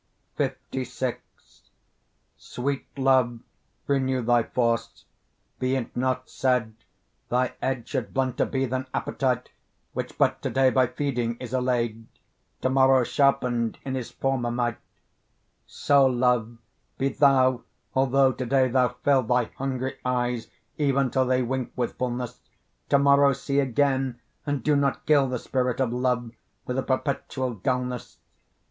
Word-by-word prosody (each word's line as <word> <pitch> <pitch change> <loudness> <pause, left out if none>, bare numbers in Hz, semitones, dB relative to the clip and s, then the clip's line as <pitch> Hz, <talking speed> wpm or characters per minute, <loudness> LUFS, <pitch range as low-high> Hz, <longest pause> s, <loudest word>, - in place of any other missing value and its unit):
LVI 130 -1 -3 1.2
Sweet 135 +2 -4
love, 130 -3 +2 0.4
renew 130 -2 0
thy 120 0 +4
force; 115 0 -1 0.5
be 130 +1 +1
it 130 -3 -4
not 130 0 -1
said 125 -4 0 0.6
Thy 125 0 +1
edge 130 -3 -2
should 130 -5 -3
blunter 130 -2 0
be 135 -1 -1
than 130 +1 -3
appetite, 125 -2 -1 0.4
Which - - -5
but - - +2
to - - -2
day 130 -1 +3
by 130 -1 +3
feeding 120 -3 -2
is 125 -1 -8
allay'd, 120 -3 -1 0.5
To 130 - +1
morrow 130 -1 +5
sharpened 125 -4 +1
in 135 - -3
his 130 -3 -3
former 135 -3 -1
might: 120 -1 -1 0.9
So, 140 -2 +3
love, 120 -2 +1 0.4
be 135 - +1
thou, 130 -2 +4 0.3
although 135 0 +3
to 130 - -4
day 130 0 +3
thou 125 0 +2
fill 140 -2 +4
Thy 125 0 0
hungry 130 -1 -3
eyes, 125 -2 -1 0.3
even 140 -3 +2
till 130 -1 +2
they 130 0 +2
wink 130 0 -3
with 125 -2 -3
fulness, 125 -1 -3 0.5
To 140 - +5
morrow 140 0 +5
see 140 +2 -1
again, 135 -1 +1 0.3
and 145 -1 -1
do 150 -1 +3
not 140 -1 0
kill 145 -3 +4
The 125 - -1
spirit 125 0 -1
of 125 -3 +1
love, 125 -2 0 0.3
with 125 +1 -2
a - - +1
perpetual 130 -1 -2
dulness. 125 +2 -3
130 Hz, 140 wpm, -26 LUFS, 125-135 Hz, 1.2 s, morrow